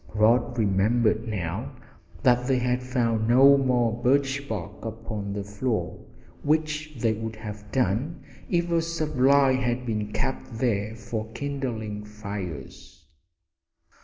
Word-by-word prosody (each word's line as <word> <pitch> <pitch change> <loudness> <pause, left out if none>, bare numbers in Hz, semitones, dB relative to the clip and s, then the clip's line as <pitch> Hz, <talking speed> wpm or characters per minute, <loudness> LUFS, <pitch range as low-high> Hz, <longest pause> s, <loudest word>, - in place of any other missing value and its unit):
Rod 120 +4 +3
remembered 110 +2 +2
now 90 -6 -3 0.5
that 125 0 +4
they 135 -1 +3
had 125 0 0
found 115 -3 0
no 135 +4 +7
more 120 -4 +1
birch 140 +2 +1
bark 105 -1 -5
upon 110 -2 -5
the 100 0 -3
floor, 105 +4 -3 0.4
which 155 0 0
they 115 -1 +2
would 110 0 -5
have 105 -1 -8
done 130 - 0 0.3
if 170 -1 +1
a 165 -1 +3
supply 140 -4 +3
had 125 -1 0
been 105 -3 -2
kept 125 0 -3
there 110 -3 0
for 110 0 -5
kindling 120 -7 -4
fires. 100 -9 -8
115 Hz, 125 wpm, -26 LUFS, 105-130 Hz, 0.5 s, no